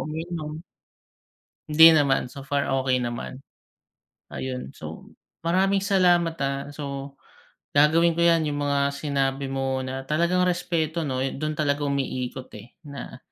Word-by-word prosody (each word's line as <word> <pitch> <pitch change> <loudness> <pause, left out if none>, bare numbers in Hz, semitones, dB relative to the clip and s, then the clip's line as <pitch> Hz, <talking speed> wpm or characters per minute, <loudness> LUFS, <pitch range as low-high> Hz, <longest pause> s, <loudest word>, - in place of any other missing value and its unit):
umiinom. 160 -1 -5 1.1
Hindi 160 +2 +8
naman. 135 -3 +1
So 135 -1 -10
far, 140 -2 0
okey 130 -1 +1
naman. 120 +2 -5 0.9
Ayun, 130 -1 -5
so, - - -9 0.4
maraming 195 +3 +2
salamat 175 -4 +3
ah. 140 0 -1
So, 140 -1 -6 0.6
gagawin 160 +4 +4
ko 170 - -1
yan 165 -2 +4
yung 145 -1 -2
mga 140 0 +1
sinabi 140 -1 -1
mo 135 -1 -1
na 130 +1 -5
talagang 170 +5 +2
respeto, 170 -2 -1
'no, 130 -4 -2
dun 155 +1 -3
talaga 145 -1 0
umiikot 130 -2 -3
eh, 110 +4 -13
na 140 -1 -8
145 Hz, 130 wpm, -25 LUFS, 135-165 Hz, 1.1 s, Hindi